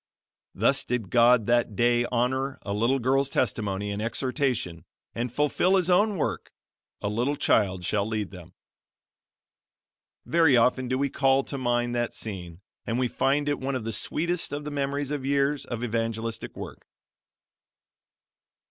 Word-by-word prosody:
Thus - - +2
did 115 -6 -3
God 120 -1 +5
that 120 -2 +1
day 120 +2 +3
honor 130 +3 -1
a 100 - -3
little 115 +6 +2
girl's 135 +2 +1
testimony 105 -6 -1
and 100 +1 -3
exhortation 120 - -1 0.3
and 120 +1 -3
fulfill 150 +7 +2
His 185 -1 +2
own 205 +2 +3
work, - - -2 0.5
"A - - 0
little 120 +7 0
child 95 -9 +1
shall 105 +1 0
lead 110 -3 -3
them." 90 -4 -12 1.7
Very 160 -6 +4
often 125 +2 +2
do 130 +1 0
we 140 +1 0
call 135 0 +3
to 140 - -5
mind 120 -1 0
that 120 -1 -2
scene, 90 -5 -6 0.3
and 115 - -1
we 125 0 +1
find 140 +4 0
it 145 -1 0
one 135 +1 -2
of 125 - -3
the 115 0 -3
sweetest 165 +11 0
of 145 +1 -4
the 150 - -5
memories 140 0 -2
of 145 -3 -3
years 140 +1 +1
of 120 -1 -5
evangelistic 115 -1 -3
work. - - -8
125 Hz, 155 wpm, -26 LUFS, 110-140 Hz, 1.7 s, God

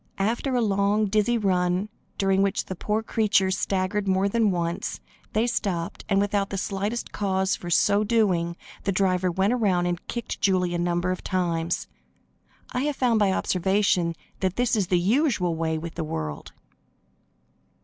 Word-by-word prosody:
After 235 +6 0
a 245 - +2
long, 205 0 +2
dizzy 215 +3 +2
run, 185 -1 +1 0.3
during 195 -1 +2
which 195 -1 0
the 190 - -5
poor 215 +5 -1
creatures 205 -4 +2
staggered 195 +1 -1
more 190 +1 +2
than 220 +1 +2
once, 170 -2 -2 0.3
they 220 +2 +2
stopped, 180 -8 -2
and, 195 -1 +3
without 200 0 0
the 195 - -3
slightest 200 +5 -3
cause 190 -2 0
for 175 - -7
so 200 +4 +3
doing, 185 -6 +1 0.3
the 200 - 0
driver 185 -1 +1
went 190 +6 +1
around 195 -7 +1
and 175 0 -3
kicked 235 -1 -5
Julie 180 -2 +2
a 175 - -1
number 175 +1 0
of 185 - -4
times. 170 -2 -1 0.8
I 250 - -1
have 295 -1 -1
found 240 -4 +2
by 200 -2 +3
observation 190 -2 +1 0.2
that 190 -1 -1
this 245 -1 +1
is 200 -4 0
the 180 -1 +2
usual 205 - +2
way 160 0 -1
with 165 +1 -6
the 165 - -3
world. 80 - -5
195 Hz, 165 wpm, -25 LUFS, 180-210 Hz, 0.8 s, and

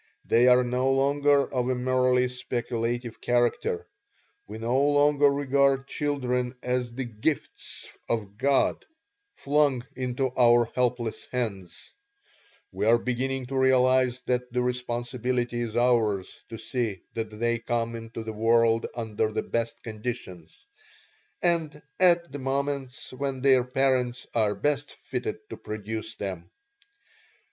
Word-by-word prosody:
They 120 +2 +4
are 125 0 +6
no 125 +2 +1
longer 140 +1 +3
of 125 -1 0
a 130 - +1
merely 125 0 +2
speculative 120 -1 -3
character. 125 - 0 0.6
We - - -7
no 120 +4 +1
longer 145 0 +4
regard 140 -1 +2
children 130 -5 -1
as 125 -1 -1
the 130 0 -3
'gifts 120 +7 -3 0.2
of 105 -4 -2
God' 135 +1 +2 0.5
flung 140 -3 +1
into 130 0 -1
our 120 -1 +5
helpless 125 -2 -1
hands; 100 -8 -4 0.8
we 105 - -1
are 115 +1 +6
beginning 130 +2 -2
to 135 +2 -6
realize 130 -1 +3
that 125 0 -2
the 125 0 0
responsibility 120 0 -2
is 115 -1 -3
ours 115 -6 +1
to 115 - -6
see 110 -4 -3
that 110 -1 -3
they 115 +2 -1
come 115 0 -2
into 115 0 -7
the 110 0 -5
world 115 +1 +3
under 110 -2 -1
the - - -2
best 115 0 -3
conditions, 110 -6 -7 0.8
and 165 -4 +1 0.2
at 175 -3 +4
the 145 - -6
moments 135 -1 -3
when 135 0 -3
their 130 -2 +5
parents 125 -1 0
are 105 -3 +2
best 145 -1 -1
fitted 430 0 -5
to - - -6
produce 110 +1 -5
them. 90 -4 -6
125 Hz, 130 wpm, -27 LUFS, 115-135 Hz, 0.8 s, are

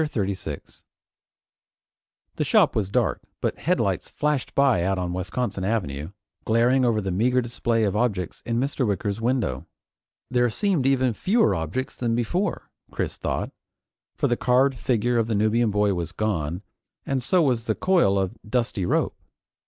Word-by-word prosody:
CHAPTER 155 -1 -2
36 95 - -4 1.5
The - - +1
shop - - +3
was 100 -3 0
dark - - 0 0.2
but - - -2
headlights - - 0
flashed 150 -3 -1
by 135 -9 +4
out 95 +2 0
on 90 -1 -2
Wisconsin 95 +3 -3
Avenue, 80 -8 -2 0.3
glaring 120 +4 +3
over 115 -3 +2
the 95 -1 -3
meager 120 +7 +2
display 120 -1 0
of 100 -2 0
objects 105 -6 -1
in 115 0 -2
Mr. 135 -1 0
Wicker's 100 +1 -2
window. 120 -2 -1 0.6
There 125 -1 +3
seemed 175 - +1
even 130 -3 +2
fewer 190 - +2
objects 85 - -3
than 115 -2 -1
before, 175 - -2 0.2
Chris - - -3
thought, - - -3 0.6
for 140 - +1
the 120 - +2
carved 130 +3 +3
figure 120 0 +1
of 115 - +1
the 115 - 0
Nubian 110 +3 +2
boy 105 -1 +2
was 85 -2 -4
gone, 90 -4 -2 0.4
and 135 -2 -1
so 175 +7 +2
was 125 -5 +1
the - - 0
coil 175 - +3
of 95 +3 -2
dusty 110 -5 -1
rope. - - +1
115 Hz, 160 wpm, -24 LUFS, 100-125 Hz, 1.5 s, by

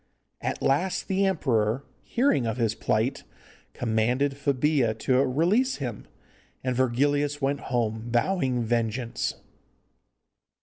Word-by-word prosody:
At - - -3
last 175 +8 +1
the 195 +1 +2
emperor, 125 - +1 0.2
hearing 235 - +1
of 115 - -2
his 115 -3 +1
plight, 110 +3 0 0.5
commanded 120 +4 +1
Febilla 140 -3 +1
to 130 +1 +2
release 175 - +2
him, 120 -7 -5 0.6
and 130 -1 -1
Virgilius 145 +4 +1
went 140 0 0
home 115 -2 -2
vowing 130 -1 +1
vengeance. 115 +1 -1
130 Hz, 105 wpm, -26 LUFS, 115-145 Hz, 0.6 s, the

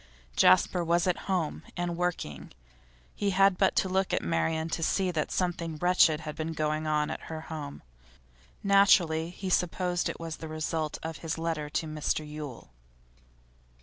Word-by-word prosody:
Jasper 170 - +4
was 170 +1 +2
at 180 -2 -1
home, 180 -5 0 0.2
and 175 -1 -1
working. 170 - -3 0.6
He 200 - -1
had 195 0 +4
but 190 - +3
to - - +2
look 190 0 0
at - - +1
Marian 85 - 0
to 165 - -2
see 185 +3 +1
that 155 -3 -1
something 170 -3 -1
wretched 170 -2 +4
had 155 -1 -6
been 160 +1 -3
going 155 0 -1
on 150 -1 +1
at - - -7
her 160 -1 -5
home; 150 -3 -7 0.8
naturally 180 -5 +4
he 185 +1 -5
supposed 180 0 +1
it - - -5
the 165 -1 -6
result 155 0 -2
of 160 0 -4
his 165 -1 -4
letter 160 -2 -2
to 160 - -1
Mr 155 0 -2
Yule. 150 - -8
165 Hz, 160 wpm, -29 LUFS, 155-180 Hz, 0.8 s, Jasper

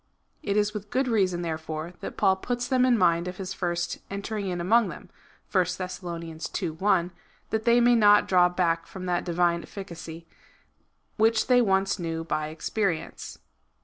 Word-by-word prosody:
It 205 -9 -1
is 210 0 +1
with 210 -1 -6
good 260 +3 0
reason, 190 -7 +1
therefore, 160 0 -4
that - - -7
Paul 190 0 +3
puts 245 +4 -3
them 255 -1 +3
in 245 -2 +4
mind 170 -2 +2
of 180 0 -6
his 190 0 -5
first 175 -2 -2
enter 200 +2 -5
ing 205 -2 -3
in 180 -1 -2
among 215 +6 +3
them, - - -10 0.4
(1 185 -3 +3
Thess. 180 +2 -5
ii. 165 +1 -4
1,) 180 +1 +1 0.4
that 220 0 -1
they 235 0 +5
may 240 0 +5
not 210 -3 +5
draw 180 -1 +5
back 170 -2 0
from 185 -1 -8
that 175 -1 0
divine 175 -1 +1
efficacy, 170 -4 -9 0.9
which 220 0 +3
they 250 -1 +5
once 195 -2 +1
knew 165 -1 -3
by 155 -2 -2
experience. 165 +3 -3
185 Hz, 175 wpm, -26 LUFS, 170-210 Hz, 0.9 s, they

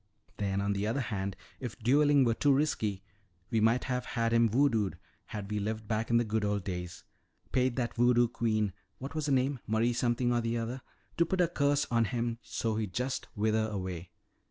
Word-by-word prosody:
"Then 100 -1 0
on 100 0 0
the 100 +1 -1
other 115 +5 0
hand, 100 -5 -3 0.2
if 125 -4 -6
dueling 140 +3 +4
were 115 - +3
too 145 +5 +2
risky, 110 -9 0 0.5
we 115 - +2
might 115 +3 +3
have 125 -1 -1
had 115 -2 -1
him 115 -1 +4
voodooed, 115 -5 +2 0.3
had 105 -1 -6
we 105 - 0
lived 110 +1 -3
back 110 +1 -1
in 120 - +4
the 120 - +3
good 110 -1 -1
old 105 -1 0
days. 90 -2 -5 0.5
Paid 130 -1 +2
that 120 -3 -1
voodoo 120 0 +4
queen 110 -4 0 0.2
what 135 +3 -7
was 155 -1 -2
her - - +1
name? 135 0 +2
Marie 115 +2 +2
something 120 +1 +1
or - - +2
other 115 +2 -2 0.4
to 170 - +4
put 190 - -1
a 175 - +5
curse 145 -1 +1
on 115 -1 +3
him 115 0 -2
so 110 -1 -2
he'd 105 -5 -3
just 125 +2 -2
wither 110 +1 +1
away." 95 -4 -5
115 Hz, 200 wpm, -31 LUFS, 105-125 Hz, 0.5 s, a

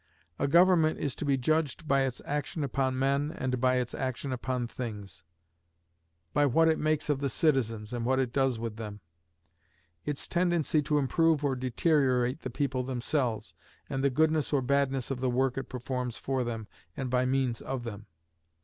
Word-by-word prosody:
A 140 - +1
government 170 0 +5
is 140 -3 -2
to - - -5
be 140 -1 +2
judged 155 +3 0
by 140 -1 +3
its 130 -2 -2
action 150 +2 -2
upon 135 -1 0
men 140 +3 +1
and 125 -2 -2
by 130 0 +3
its 125 -1 -1
action 130 0 -3
upon 125 -1 -2
things; 105 -8 -7 1.1
by 145 0 +4
what 165 +5 +4
it 160 - +2
makes 155 0 +1
of 145 -2 +1
the 140 -1 -1
citizens, 115 -7 0
and 120 -1 -2
what 130 +2 +2
it 130 -3 0
does 135 -3 +2
with 115 -1 -5
them; 105 -2 -7 1.0
its 145 +4 -3
tendency 175 -4 +2
to 150 +1 +1
improve 150 +2 +2
or 135 -2 +1
deteriorate 130 0 +1
the 130 - -5
people 130 0 -1
themselves, 125 -2 -2 0.4
and 135 0 -1
the 140 - +4
goodness 155 +2 +2
or 140 -3 +2
badness 135 -1 +1
of 130 - -2
the 130 0 0
work 130 +1 +1
it 135 - -5
performs 125 -1 -3
for 130 -1 -1
them, 115 -3 -4 0.3
and 130 -2 -3
by 125 0 +3
means 130 -3 0
of 130 -2 -4
them. 105 -2 -7
130 Hz, 180 wpm, -29 LUFS, 125-145 Hz, 1.1 s, government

